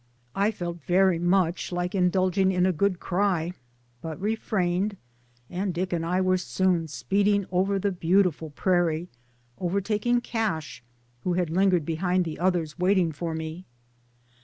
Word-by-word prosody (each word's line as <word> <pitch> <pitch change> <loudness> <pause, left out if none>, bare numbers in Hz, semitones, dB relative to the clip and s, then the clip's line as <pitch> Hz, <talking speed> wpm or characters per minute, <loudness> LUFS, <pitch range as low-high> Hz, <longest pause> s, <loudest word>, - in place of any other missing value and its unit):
I 200 +2 +2
felt 175 -5 -5
very 180 +2 +3
much 175 0 +1
like 175 0 -2
indulging 185 0 +2
in 180 -1 +2
a 190 - +3
good 185 +2 +1
cry, 180 -3 0 0.5
but 160 -2 -6
refrained, 200 -2 -1 0.5
and 185 +2 -3
Dick 180 +1 -2
and 165 -1 -1
I 180 +3 0
were 185 0 +2
soon 180 -2 0
speeding 200 - +1
over 190 +2 +1
the 200 +1 0
beautiful 175 -2 +1
prairie, 175 +1 0 0.5
overtak 200 +5 -1
ing 240 0 +3
Cash, 200 - -3 0.4
who 180 - 0
had 175 -2 0
lingered 180 -2 +3
behind 180 +3 0
the 160 -2 -5
others, 175 -3 0
waiting 180 -2 +3
for 160 +2 -4
me. 160 +3 -6
180 Hz, 145 wpm, -26 LUFS, 170-195 Hz, 0.5 s, very